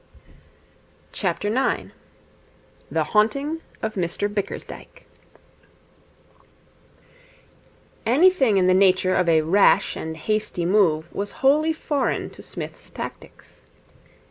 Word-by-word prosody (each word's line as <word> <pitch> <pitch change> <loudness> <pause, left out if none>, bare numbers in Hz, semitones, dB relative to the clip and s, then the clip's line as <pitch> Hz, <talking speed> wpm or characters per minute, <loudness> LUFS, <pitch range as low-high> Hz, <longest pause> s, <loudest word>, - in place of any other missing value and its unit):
The 235 +6 -1 1.2
Haunting 275 +9 +1 0.2
of 220 0 -2
Mr 190 +3 -2
Bickersdyke 200 -2 -6 3.0
Anything 265 - +4
in 185 - +3
the 185 - +4
nature 185 -1 +3
of 180 -2 +2
a 160 -1 +4
rash 190 +6 +3
and 160 0 -6
hasty 215 0 -2
move 170 -4 +2
was 205 +1 -3 0.2
wholly 305 +4 +4
foreign 295 -3 -2
to - - -13
Psmith's - - -9
tactics. - - -10
205 Hz, 90 wpm, -23 LUFS, 185-265 Hz, 3.0 s, Anything